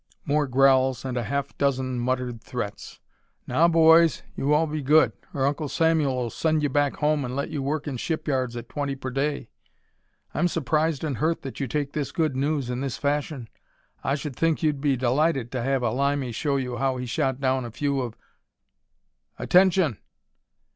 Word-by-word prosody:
More 145 Hz, 0 st, +1 dB
growls, 130 Hz, -1 st, +3 dB
and 130 Hz, -1 st, -3 dB
a 120 Hz, -2 st, -1 dB
half 140 Hz, +3 st, -3 dB
dozen 130 Hz, -3 st, 0 dB
muttered 125 Hz, -1 st, -2 dB
threats. 105 Hz, -5 st, -6 dB, 0.5 s
"Now 155 Hz, +7 st, +3 dB
boys, 165 Hz, -1 st, +5 dB
you 140 Hz, -, -1 dB
all 150 Hz, +2 st, +4 dB
be 155 Hz, -1 st, -3 dB
good, 150 Hz, +4 st, +4 dB, 0.2 s
or 135 Hz, -1 st, 0 dB
Uncle 145 Hz, +1 st, -1 dB
Samuel'll 140 Hz, -8 st, +1 dB
send 155 Hz, -1 st, 0 dB
you 145 Hz, -, +2 dB
back 145 Hz, +1 st, +1 dB
home 150 Hz, -1 st, +1 dB
and 125 Hz, 0 st, -4 dB
let 140 Hz, +4 st, -3 dB
you 150 Hz, -3 st, -3 dB
work 145 Hz, +2 st, -2 dB
in 145 Hz, -, -2 dB
the -, -, -4 dB
shipyards 130 Hz, -6 st, -2 dB
at 120 Hz, 0 st, -7 dB
twenty 140 Hz, 0 st, -3 dB
per 130 Hz, -1 st, -6 dB
day. 140 Hz, -2 st, -2 dB, 0.8 s
I'm 175 Hz, +4 st, +2 dB
surprised 160 Hz, -1 st, 0 dB
and 145 Hz, -6 st, -2 dB
hurt 160 Hz, +2 st, 0 dB
that 135 Hz, -, -7 dB
you 135 Hz, -, -1 dB
take 145 Hz, +2 st, -2 dB
this 140 Hz, -2 st, -2 dB
good 155 Hz, -3 st, 0 dB
news 140 Hz, 0 st, 0 dB
in 125 Hz, +1 st, -3 dB
this 135 Hz, -3 st, -3 dB
fashion. 145 Hz, -3 st, -2 dB, 0.6 s
I 140 Hz, -, +1 dB
should 145 Hz, -2 st, -5 dB
think 165 Hz, +2 st, 0 dB
you'd 150 Hz, -3 st, +1 dB
be 140 Hz, -3 st, +2 dB
delighted 130 Hz, +1 st, +1 dB
to 130 Hz, -, -2 dB
have 135 Hz, +1 st, 0 dB
a 115 Hz, -, +1 dB
Limey 140 Hz, 0 st, 0 dB
show 140 Hz, +4 st, -1 dB
you 125 Hz, -2 st, -3 dB
how 135 Hz, 0 st, 0 dB
he 125 Hz, -, -4 dB
shot 130 Hz, +1 st, -1 dB
down 130 Hz, -1 st, +1 dB
a 120 Hz, -, -5 dB
few 140 Hz, +3 st, -1 dB
of 120 Hz, -3 st, -5 dB, 0.6 s
" -, -, -50 dB
"Attention!" 180 Hz, -, +3 dB
140 Hz, 190 wpm, -25 LUFS, 130-150 Hz, 0.8 s, boys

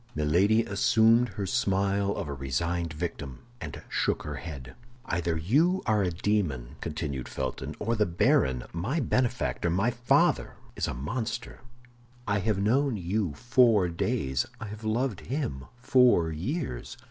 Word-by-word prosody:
Milady 90 Hz, +9 st, +3 dB
assumed 115 Hz, +2 st, +4 dB
her 100 Hz, -, -1 dB
smile 100 Hz, +1 st, +1 dB
of 100 Hz, -6 st, -4 dB
a 70 Hz, -, -4 dB
resigned 80 Hz, +6 st, -2 dB
victim, 75 Hz, -, -6 dB, 0.2 s
and -, -, -7 dB
shook -, -, 0 dB
her 75 Hz, -1 st, -5 dB
head. 65 Hz, -2 st, -8 dB, 0.3 s
"Either 85 Hz, -4 st, -1 dB
you 155 Hz, -, +2 dB
are 110 Hz, -2 st, +2 dB
a 95 Hz, -, +1 dB
demon," 80 Hz, -, -1 dB
continued 75 Hz, -5 st, -4 dB
Felton, 65 Hz, -2 st, -4 dB
"or 115 Hz, +2 st, -1 dB
the 105 Hz, -2 st, +2 dB
baron—my 85 Hz, -, +1 dB
benefactor, 125 Hz, -, 0 dB
my 95 Hz, +8 st, +2 dB
father—is 120 Hz, 0 st, 0 dB
a -, -, -3 dB
monster. 110 Hz, -, -4 dB, 0.7 s
I 100 Hz, 0 st, +1 dB
have 105 Hz, +1 st, 0 dB
known 120 Hz, +5 st, +2 dB
you 90 Hz, -3 st, -1 dB
four 115 Hz, -, +4 dB
days; 65 Hz, -5 st, -1 dB
I 110 Hz, -, -5 dB
have 105 Hz, +2 st, -9 dB
loved 110 Hz, -1 st, -1 dB
him 110 Hz, -, -3 dB
four 125 Hz, -10 st, +4 dB
years. 95 Hz, -, -4 dB
100 Hz, 135 wpm, -28 LUFS, 80-115 Hz, 0.7 s, assumed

